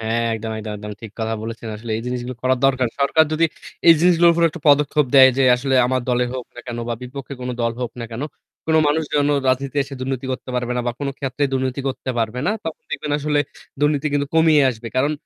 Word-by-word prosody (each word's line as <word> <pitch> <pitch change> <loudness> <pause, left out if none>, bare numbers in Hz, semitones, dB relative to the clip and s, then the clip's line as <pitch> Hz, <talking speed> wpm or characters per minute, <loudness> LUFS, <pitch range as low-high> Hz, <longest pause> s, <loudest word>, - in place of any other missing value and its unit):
অ - - -8
হ্যাঁ। 115 +1 0
একদম, 110 0 -5
একদম, 110 0 -5
একদম 105 0 -7
ঠিক 110 - -8
কথা 110 0 -1
বলেছেন। 115 0 -6
আসলে 115 +2 -8
এই 115 - -5
জিনিসগুলো 125 0 -4
করা 130 0 +3
দরকার। 130 -3 +2
সরকার 160 +3 +4
যদি 160 +2 +2 0.4
এই 165 - +10
জিনিসগুলোর 170 -1 +5
উপর 170 - +1
একটা 170 +2 -9
পদক্ষেপ 145 0 +4
দেয় 130 -1 +9
যে 135 - +3
আসলে 135 +2 -1
আমার 130 0 0
দলে 125 0 +2
হোক 130 -1 -5
না 120 - -8
কেন 120 -1 -5
বা 120 - -1
বিপক্ষে 135 +2 -7
কোন 125 - -4
দল 115 0 +1
হোক 125 -2 -3
না - - -3
কেন, 115 +4 -5 0.4
কোন 160 - +1
মানুষ 150 +2 +2
যেন 145 -1 +3 0.2
রাজনীতি 135 +2 0 0.2
দুর্নীতি 130 0 -3
করতে 130 - -6
পারবে 125 0 -1
না - - +1
বা 120 - 0
কোন 140 - -2
ক্ষেত্রে 135 +1 -3
দুর্নীতি 130 0 -1
করতে 130 0 -4
পারবে 115 +1 -1
না। - - +3
তখন 160 -1 -6
দেখবেন 150 - -3
আসলে 150 0 0 0.4
দুর্নীতি 145 0 +2
কিন্তু 145 0 +1
কমিয়ে 160 -2 +5
আসবে। 115 -1 -7
কারণ 140 +4 +2
130 Hz, 230 wpm, -21 LUFS, 120-145 Hz, 0.4 s, এই